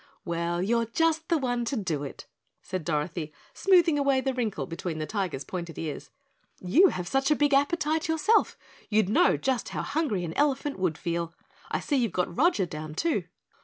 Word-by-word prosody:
"Well, 170 0 -1
you're 230 +3 +1
just 320 +6 +1
the 335 - +3
one 245 -4 -1
to 250 - -2
do 175 - -2
it," 140 - -8 0.4
said 185 -3 -4
Dorothy, 155 0 -2 0.2
smoothing 345 -6 +4
away 275 -2 +3
the 265 0 -1
wrinkle 235 -5 -2
between 165 -1 -5
the 155 - -2
Tiger's 185 -8 -3
pointed 170 -3 -6
ears. 155 -3 -5 0.5
"You 300 - +5
have 180 - -3
such 270 +5 +1
a 300 - +4
big 290 -1 +2
appetite 310 +2 +2
yourself, 320 +8 +2 0.3
you'd 215 -3 +2
know 340 +11 +4
just 260 -3 -1
how - - -3
hungry 265 - -1
an 165 - -5
elephant 285 -3 0
would 175 -4 0
feel. 170 -1 -3 0.3
I - - -1
see 285 - 0
you've 235 -6 +1
got 180 -1 -1
Roger 280 - +3
down, 155 -1 -7
too." 335 - 0
230 Hz, 185 wpm, -27 LUFS, -, 0.5 s, You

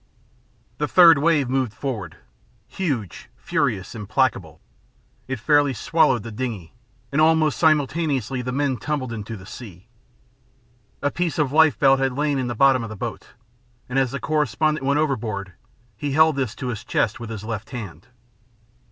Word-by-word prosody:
The 150 - 0
third 165 -4 +7
wave 150 -3 +2
moved 130 -3 -1
forward, 110 - -5 0.5
huge, 125 - -4
furious, 95 -1 -2
implacable. 105 -4 -1 0.7
It 135 -2 -4
fairly 145 +2 +3
swallowed 130 -6 +2
the 115 - -7
dingey, 110 -7 -5 0.4
and 140 +2 +2
almost 155 -1 +3
simultaneously 145 -5 +1
the 125 +1 -4
men 135 -1 0
tumbled 130 0 -3
into 110 0 -6
the 95 - -13
sea. 100 -2 -11 1.1
A 145 - +1
piece 170 -2 -2
of 150 -4 +1
lifebelt 140 -3 +4
had 135 -1 0
lain 145 0 0
in 130 - -2
the 120 - -3
bottom 135 +1 +4
of 115 - -5
the 110 - -7
boat, - - -7 0.5
and 125 +2 0
as 135 -2 +1
the 140 +3 -5
correspondent 155 -1 0
went 140 +2 +2
overboard 110 -10 -2 0.4
he 140 +6 -3
held 160 0 +5
this 130 -5 -2
to 130 - -5
his 115 -3 -5
chest 105 +1 0
with 115 -2 -7
his 110 -3 -6
left 110 -1 -5
hand. 115 -2 -8
130 Hz, 160 wpm, -22 LUFS, 115-150 Hz, 1.1 s, third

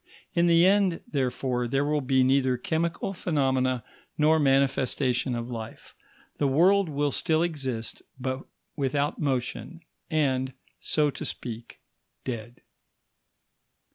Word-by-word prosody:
In 170 0 +3
the 170 0 +6
end, 190 -3 +3
therefore, 125 -3 -1
there 135 +4 +1
will 150 0 +1
be 130 0 +3
neither 130 -1 +3
chemical 165 +7 -1
phenomena 130 - 0 0.3
nor 155 +1 +4
manifestation 135 -2 +2
of 120 0 -4
life; 115 -2 -8 0.5
the 145 - +3
world 180 +7 +4
will 145 0 0
still 160 +2 +1
exist, 135 -9 -3 0.2
but 130 +1 -2 0.4
without 145 +1 -1
motion, 140 +5 -2 0.3
and, 130 -4 +1 0.3
so 150 -2 +1
to - - -7
speak, 115 -1 -6 0.4
dead. 120 -2 -6
135 Hz, 115 wpm, -27 LUFS, 130-155 Hz, 0.5 s, the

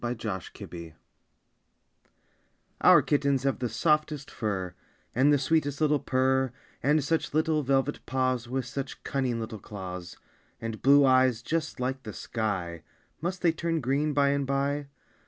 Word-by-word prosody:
_ - - -17
OUR 120 +1 -1 0.4
KITTENS 85 -2 -9 1.9
Our - - +7
kittens 140 -2 +1
have 135 -2 0
the 125 -1 -1
softest 150 +4 0
fur, 95 -5 -3 0.4
And 135 +4 +4
the 145 - +5
sweetest 145 0 0
little 150 -2 +3
purr, 130 0 +1 0.3
And 150 +2 +3
such 160 0 -1
little 155 -1 +2
velvet 135 +1 0
paws 130 -2 0
With 130 0 -2
such 135 +2 -6
cunning 130 -4 -1
little 110 -1 -5
claws, 90 -3 -7 0.4
And 115 -1 -5
blue 140 +1 +6
eyes, 130 -2 +4
just 160 +1 -2
like 130 +1 -2
the 110 -4 -8
sky! 95 -9 -3 0.4
(Must 180 +2 -3
they 170 - +5
turn 165 0 -1
green, 145 +3 0
by 140 -1 +3
and 140 -1 0
by?) 140 +1 0
135 Hz, 150 wpm, -28 LUFS, 120-145 Hz, 1.9 s, Our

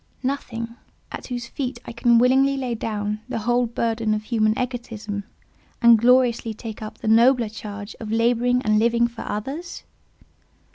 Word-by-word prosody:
Nothing, 235 -3 -4 0.3
at - - -7
whose 245 -2 -4
feet 250 0 -4
I - - -7
can 235 0 +3
willingly 265 +3 +4
lay 255 -3 -2
down 210 -1 -3
the - - -2
whole 240 +2 +1
burden 225 -1 -1
of 210 - -4
human 215 -1 +1
egotism, 225 -5 -4 0.5
and 235 -1 +7
gloriously 235 -2 +3
take 220 0 -8
up 215 +1 -7
the - - -6
nobler 235 +1 +4
charge 210 0 -8
of 215 -1 -6
labouring 240 +2 +2
and 215 -1 +3
living 235 +1 +3
for 235 -1 -10
others? 275 +12 -5
235 Hz, 155 wpm, -23 LUFS, 215-245 Hz, 0.5 s, and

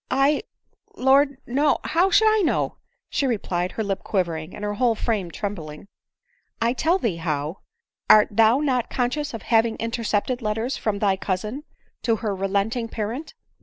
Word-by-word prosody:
" - - -49
I! 275 +5 +3 0.3
— - - -47
Lord 275 +1 +3
— - - -44
no 285 +4 +2
— - - -33
How 350 +4 +4
should 440 +3 +5
I 435 -1 +4
know 340 - 0 0.2
?" - - -52
she 275 - +1
replied, 185 -6 -1
her 220 - -2
lip 195 -2 -2
quivering, 170 -4 -2
and 210 - -8
her 205 0 -1
whole 235 +1 +2
frame 210 -5 -1
trembling. 170 -3 -6 0.4
" 485 0 -44
1 230 +1 +2
tell 330 +7 +2
thee 225 - -1
how. 155 0 -3 0.3
— - - -51
Art 210 -1 +7
thou 225 +5 +4
not 255 -5 0
conscious 250 +2 -1
of 225 - -8
having 225 -1 +2
intercepted 230 +1 -1
letters 225 +4 -1
from 210 -2 -2
thy 200 -2 +1
cousin, 210 +10 -3 0.4
to 230 - +2
her 215 -2 -2
relenting 200 +5 -1
parent 230 +7 -5
225 Hz, 190 wpm, -23 LUFS, 200-265 Hz, 0.4 s, Art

